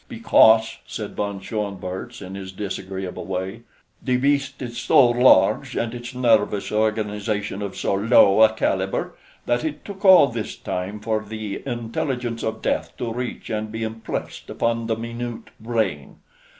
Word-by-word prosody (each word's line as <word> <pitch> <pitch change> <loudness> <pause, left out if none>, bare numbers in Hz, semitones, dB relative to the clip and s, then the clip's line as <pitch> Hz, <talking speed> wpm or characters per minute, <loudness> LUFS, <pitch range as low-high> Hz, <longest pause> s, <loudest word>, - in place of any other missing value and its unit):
"Because," 115 - +4
said 105 -2 -6
von 100 -1 -3
Schoenvorts 100 +1 -5
in 95 0 -8
his 95 -1 -7
disagreeable 95 -1 -5
way, 95 +4 -4 0.4
"the 125 -1 +1
beast 140 +1 +1
is 120 -2 -5
so 130 0 +5
large, 125 +2 +4
and 115 0 -1
its 120 +1 -7
nervous 115 -5 +2
organization 105 -1 -1
of 100 -2 -5
so - - -1
low 100 0 +5
a 110 0 +7
caliber, 95 -3 -1 0.3
that 120 +3 0
it 155 -2 -4
took 200 0 -9
all 190 -6 +8
this 115 -4 -4
time 95 +4 -4
for 110 0 -1
the 110 -1 -6
intelligence 120 0 -3
of 110 0 -4
death - - -1
to 115 -2 -3
reach 125 -1 -5
and 110 0 -3
be 110 +1 -4
impressed 110 0 -5
upon 115 0 -1
the 110 - 0
minute 115 0 -6
brain. 110 -11 -2
110 Hz, 150 wpm, -23 LUFS, 100-120 Hz, 0.4 s, all